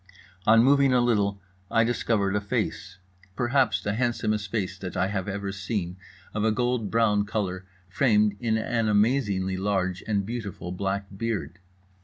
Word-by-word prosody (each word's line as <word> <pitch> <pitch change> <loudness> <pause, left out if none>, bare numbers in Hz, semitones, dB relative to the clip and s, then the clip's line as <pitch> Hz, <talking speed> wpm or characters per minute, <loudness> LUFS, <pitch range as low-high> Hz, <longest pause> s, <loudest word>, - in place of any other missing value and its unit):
On 115 +1 +7
moving 140 0 +4
a 125 - +4
little 105 -5 +1 0.3
I 115 - +3
discovered 110 -4 0
a 105 - +1
face—perhaps 100 +1 -2
the 100 - -1
handsomest 110 -3 -1
face 100 -5 -2
that 90 -3 -6
I 95 +1 +1
have 95 -2 -3
ever 100 0 -3
seen, 95 -2 -3 0.4
of 105 - -1
a 110 - +3
gold 120 -2 0
brown 110 -2 +3
color, 95 -3 -3 0.2
framed 105 0 +2
in 115 -2 +1
an 115 0 0
amazingly 105 -4 +1
large 95 -2 -1
and 100 -3 0
beautiful 100 -6 -5
black 100 +2 -2
beard. 105 -3 -3
105 Hz, 150 wpm, -26 LUFS, 95-115 Hz, 0.4 s, On